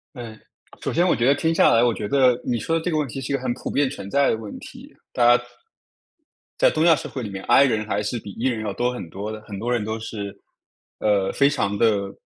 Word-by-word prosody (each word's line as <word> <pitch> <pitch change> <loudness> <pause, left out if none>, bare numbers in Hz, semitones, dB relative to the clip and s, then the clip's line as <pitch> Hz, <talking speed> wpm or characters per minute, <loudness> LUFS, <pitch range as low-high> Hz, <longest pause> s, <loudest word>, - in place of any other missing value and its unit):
呃， 115 -3 -8 0.5
首 - - -2
先 175 +3 +2
我 - - +3
觉 120 - 0
得 140 +2 +5
听 160 +3 0
下 - - +5
来， 115 +1 +4
我 120 -2 +3
觉 105 - -4
得 130 -2 +3
你 120 - -1
说 165 +10 -1
的 160 - -4
这 180 - -1
个 155 - 0
问 150 -2 0
题 135 +2 -6
是 135 - -5
一 - - +2
个 130 - -4
很 125 -2 -1
普 - - -7
遍 140 -1 +1
存 100 -8 -8
在 140 +3 +3
的 110 - +1
问 110 -2 -8
题。 - - -12 0.2
大 120 0 +5
家 - - -10 1.1
在 - - +5
东 155 - 0
亚 165 -2 +6
社 - - -6
会 130 - -6
里 105 - -5
面 95 -1 -7
，i 140 - +6
人 110 -5 0
还 105 -1 -1
是 105 +3 -3
比 100 - -9
e 120 +6 -2
人 110 -3 -3
要 100 -2 -3
多 125 +4 0
很 120 -9 -7
多 105 +3 -5
的， 110 - -7
很 105 -2 -9
多 120 +3 -2
人 115 -4 0
都 110 +1 -3
是， 100 -3 -6 0.6
呃， 100 -2 +1
非 140 - +3
常 105 -8 -1
地 100 -3 +1
120 Hz, 295 characters per minute, -23 LUFS, 105-135 Hz, 1.1 s, 亚